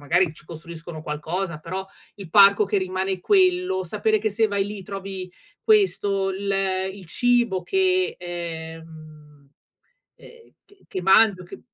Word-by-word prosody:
magari 165 +3 +2
ci 155 - -18
costruiscono 165 -1 -9
qualcosa, 160 +3 -4
però 185 +4 -5 0.3
il 190 -5 -10
parco 200 +1 +7
che 200 0 0
rimane 185 0 -2
quello, 365 - +2
sapere 215 +4 0
che 215 +1 -1
se 220 +2 +2
vai 200 -1 0
lì 205 -1 -7
trovi 195 -1 -7 0.3
questo, 205 - +2
l 200 +1 -4 0.4
il 195 -1 -12
cibo 240 -1 +1
che, 370 - +1
ehm, 160 -4 -9 0.7
ehm 470 -1 -17
che 405 -1 -25
che 185 - -5
mangio, 195 0 +5
che - - -11
190 Hz, 140 wpm, -23 LUFS, 170-210 Hz, 0.7 s, parco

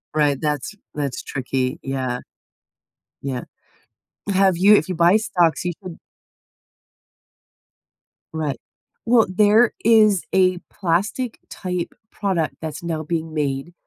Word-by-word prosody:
Right, 145 -3 +2
that's 150 +4 -2 0.2
that's 140 -4 -3
tricky. 130 +1 -2
Yeah. 130 -2 -2 1.0
Yeah. 130 -3 -3 0.9
Have 190 -2 +3
you 200 +4 +7
if 175 - +1
you 185 - -2
buy 170 +5 +5
stocks, 185 -8 +1
you 175 0 -2
should 180 -3 -8 2.4
Right. 155 -3 -2 0.5
Well, 230 -1 +4
there 210 +5 +4
is 215 -4 +5
a 185 -1 +4
plastic 205 +7 -1
type 180 -2 -4 0.2
product 185 -6 -1
that's 160 -2 -5
now 160 -2 -3
being 160 0 -3
made, 145 +1 -2
170 Hz, 115 wpm, -22 LUFS, 150-195 Hz, 2.4 s, you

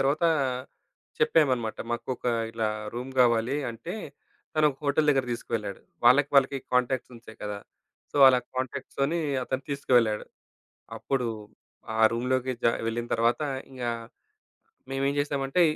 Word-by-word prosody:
తరువాత 145 +5 +2 0.9
చెప్పామన్నమాట. 130 - +2
మాకొక 120 +2 -3 0.3
ఇలా 110 -1 0 0.3
రూమ్ 125 +2 -5
గావాలి 120 +2 +3
అంటే, 165 - -7 0.6
తనొక 150 -3 +3
హోటల్ 150 +2 +2
దగ్గరకి 135 -4 +2
తీసుకెళ్ళాడు. 105 -4 -4 0.2
వాళ్ళకి, 140 +4 +6
వాళ్ళకి 135 0 +4 0.2
కాంటాక్ట్స్ 125 0 +1
ఉంటాయి 115 -1 -14
కదా! 105 -1 -4 0.5
సో, - - -5
అలా 125 - +5 0.2
కాంటాక్ట్స్‌తోని 140 +4 -2 0.3
అతను 130 +1 -3
తీసుకువెళ్ళాడు. 120 -6 +2 0.7
అప్పుడు 130 -3 -1 0.7
ఆ - - -1
రూమ్‌లోకి 130 +2 0
జా 115 - +5 0.2
వెళ్ళిన 120 +1 -2
తరువాత 115 +4 +2 0.3
ఇంగ 130 -2 -8 1.1
మేమేం‌ 135 +1 0
జే‌సామంటే, 140 +3 +1
130 Hz, 115 wpm, -27 LUFS, 120-140 Hz, 1.1 s, వాళ్ళకి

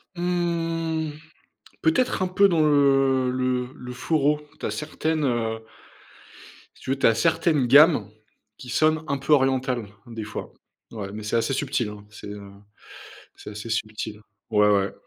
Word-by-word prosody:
Mmh, 165 -2 -1 0.7
peut-être 175 +8 +2
un 185 - +2
peu 195 +2 +4
dans 170 -3 +1
le 135 -3 +3
le 125 -1 -1
le 125 -4 -9
choro. 150 +2 +1 0.2
Tu - - -5
as - - -1
certaines, 155 0 -2
heu 115 -4 -1 1.1
si - - -18
tu - - -7
veux, 135 - -1
tu - - +5
as 115 - +3
certaines 155 -2 +2
gammes 140 - +6 0.5
qui 125 - -11
sonnent 155 +4 +2
un 140 - 0
peu 135 +3 +1
orientales, 130 -4 +1 0.2
des 115 -2 -6
fois, 105 - -7 0.4
ouais. 100 -3 -6
Mais, 110 0 -7
c'est 110 - -2
assez 115 +4 +1
subtil, 135 -4 -1
hein, 105 0 -11
c'est, 105 - -11
heu, 100 -1 -9 0.9
c'est - - -10
assez 105 +2 -8
subtil. 110 -1 -3 0.3
Ouais, 105 -1 +4
ouais, 100 -1 +2
135 Hz, 160 wpm, -24 LUFS, 110-155 Hz, 1.1 s, gammes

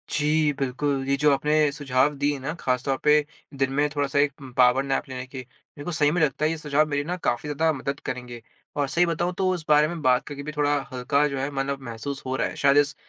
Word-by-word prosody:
जी, 150 0 +2
बिल्कुल। 135 +1 -1
ये 140 - +2
जो 150 +1 +4
आपने 150 +2 0 0.2
सुझाव 140 0 +1
दिए 145 +1 0
ना 135 +4 -4
ख़ास 125 -1 0
तौर 135 -1 0
पे 150 - +6 0.4
दिन 135 -1 +1
में 145 - +3
थोड़ा-सा 140 -1 0
एक 145 0 +2 0.2
पावर 125 +1 +5
नैप 135 -1 -2
लेने 130 -1 -5
के। 130 0 -8
मेरे 130 +3 -15
को 175 - -3
सही 150 -2 +2
में 175 +2 0
लगता 150 0 +1
है - - +3
ये 165 - -3
सुझाव 150 0 +1
मेरी 145 -1 0
ना 175 +4 -3
काफ़ी 150 -3 -2
ज़्यादा 160 +2 +1
मदद 140 +2 -3
करेंगे। 125 -2 -6 0.4
और 145 -1 +1
सही 170 +6 +2
बताऊँ 175 +1 -1
तो 190 -1 +1
उस 170 -4 -5
बारे 150 0 +5
में 170 0 -5
बात 125 -2 +2
करके 145 -1 -6
भी 150 - -5
थोड़ा 145 0 +2 0.2
हल्का 140 +4 +1
जो 140 -2 -4
है 135 +2 -1
मतलब 140 0 -2
महसूस 135 +5 -6
हो 130 0 -2
रहा - - 0
है - - -8
शायद 140 0 +5
इस 145 0 +3
145 Hz, 250 wpm, -25 LUFS, 135-150 Hz, 0.4 s, पे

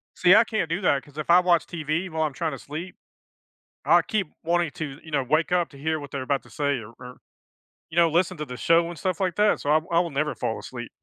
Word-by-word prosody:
See, 185 +2 +6
I 220 - +7
can't 215 -8 -2
do 170 +4 -2
that, 140 -7 +2
'cause 145 0 -18
if 155 - -5
I 175 +1 +8
watch 180 -2 +3
TV 170 +2 -3
while 160 -1 -1
I'm 150 -3 -1
trying 160 +4 -2
to 135 - -7
sleep, 160 +5 -7 0.9
I - - +6
keep 210 -5 -2 0.2
wanting 170 -2 +1
to, 145 -1 -6
you 160 - -12
know, 140 -3 +1
wake 155 +6 +1
up 175 -2 +2
to 140 - -15
hear 155 +2 -1
what 145 -1 -9
they're 140 - -4
about 140 +1 -1
to - - -18
say 145 -3 -1
or 110 0 -11
or, 125 0 -10 0.7
you 160 - -9
know, 170 -1 +5
listen 175 +2 +1
to 150 - -3
the 125 -3 -8
show 165 +5 +3
and 170 -3 -8
stuff 185 +4 -2
like 185 -3 0
that. 210 0 +3
So, 145 - -2
I - - +5
w 155 +3 +1
I 170 - +4
will 170 -2 -1
never 150 +2 -1
fall - - -3
asleep. - - -8
160 Hz, 270 wpm, -25 LUFS, 145-175 Hz, 0.9 s, I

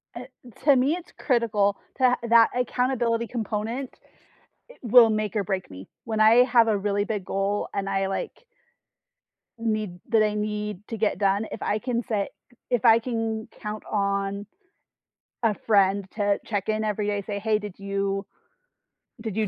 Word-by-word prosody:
Eh, 245 - -7 0.4
to 285 -2 +6
me, 265 +5 +3
it's 355 0 -7
critical 215 -6 +1 0.2
to 255 -1 +4
that 230 -1 +7
accountability 245 -2 0
component 230 +3 -3 0.8
i - - -14
will 235 -1 +7
make 215 -1 -1
or 200 - +1
break 190 - -3
me. 95 +1 -10 0.2
When 220 -2 -3
I 225 +3 +7
have 240 -3 +4
a 215 - +2
really 205 0 0
big 210 -4 -3
goal 195 +2 -1
and 200 -1 -2
I, 195 0 0
like 195 - -5 1.1
need 215 -5 -2
that 225 -2 +4
I 210 -1 +2
need 210 -1 -3
to 225 - -4
get 215 -3 0
done, 200 +2 +1
if - - -7
I 215 - 0
can 245 -1 -2
set 205 -3 0 0.4
if 245 -2 +1
I 230 -1 +7
can 225 -2 -3
count 210 0 -5
on 200 0 -1 1.0
a 220 -2 +3
friend 200 -2 +4
to 205 -2 +1
check-in 215 +1 -1
every 210 -1 -1
day, 205 -1 -1
say, 200 0 -5
"Hey, 215 +1 +1
did 205 -3 -8
you 195 0 -2 0.9
did 220 -3 -5
you 215 -2 +1
215 Hz, 165 wpm, -25 LUFS, 200-230 Hz, 1.1 s, that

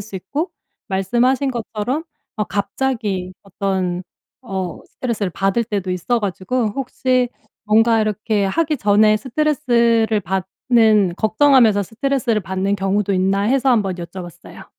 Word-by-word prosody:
수 200 -1 -7
있고 295 - -3 0.4
말씀하신 240 +8 +1
것처럼 240 +4 -3 0.3
어 210 - 0
갑자기 200 -2 -2
어떤 190 -2 -2 0.4
어 190 -7 -4
스트레스를 220 -6 -3
받을 195 +6 0
때도 200 -4 -3
있어 185 +7 0
가지고 215 +4 -1
혹시 255 -1 0 0.4
뭔가 225 +1 +4
이렇게 215 -1 0
하기 305 +10 0
전에 215 0 +4
스트레스를 235 -4 +1
받는 200 +1 +2
걱정하면서 225 -2 +4
스트레스를 235 +1 -1
받는 190 +2 -1
경우도 195 +1 0
있나 195 +1 +1
해서 265 +5 +2
한번 205 -6 +2
여쭤봤어요. 175 0 -9
215 Hz, 305 characters per minute, -19 LUFS, 195-245 Hz, 0.4 s, 뭔가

